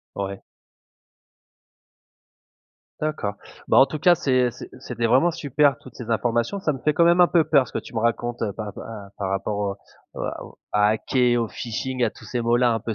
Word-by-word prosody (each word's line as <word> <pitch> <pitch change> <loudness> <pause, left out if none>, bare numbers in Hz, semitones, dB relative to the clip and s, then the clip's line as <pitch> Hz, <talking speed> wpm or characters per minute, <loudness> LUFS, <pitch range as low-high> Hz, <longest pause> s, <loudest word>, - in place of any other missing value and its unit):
Ouais. 100 0 -4 2.6
D'accord. 150 -10 -2 0.3
Bah, - - +5
en 135 - +8
tout 150 +3 -5
cas 175 +4 +5
c'est 130 -6 +2
c'est - - -10
c'était 120 -3 -2
vraiment 130 +9 +4
super 145 -3 +2
toutes 130 - -15
ces 120 -2 -7
informations. 120 - 0
Ça 155 - 0
me 135 - -6
fait 150 +3 0
quand 170 - +4
même 170 +1 +5
un 175 - +8
peu 170 -1 +3
peur 140 -5 +3
ce - - -14
que - - -2
tu - - -10
me 115 - 0
racontes 115 +1 -1 0.2
pa 105 -2 -5
pa 105 -2 -9
par 95 -2 -2
rapport 100 +2 -2
aux 100 -1 -2 0.4
à - - -4
aux - - -15
à 105 0 +4
hacker, 120 +2 +1
au 115 - -3
phishing, 125 +2 -3
à 110 - +1
tous - - -16
ces 120 +3 -3
mots-là 120 +1 +3
un 115 - -1
peu 110 +1 -4
120 Hz, 205 wpm, -23 LUFS, 110-140 Hz, 2.6 s, en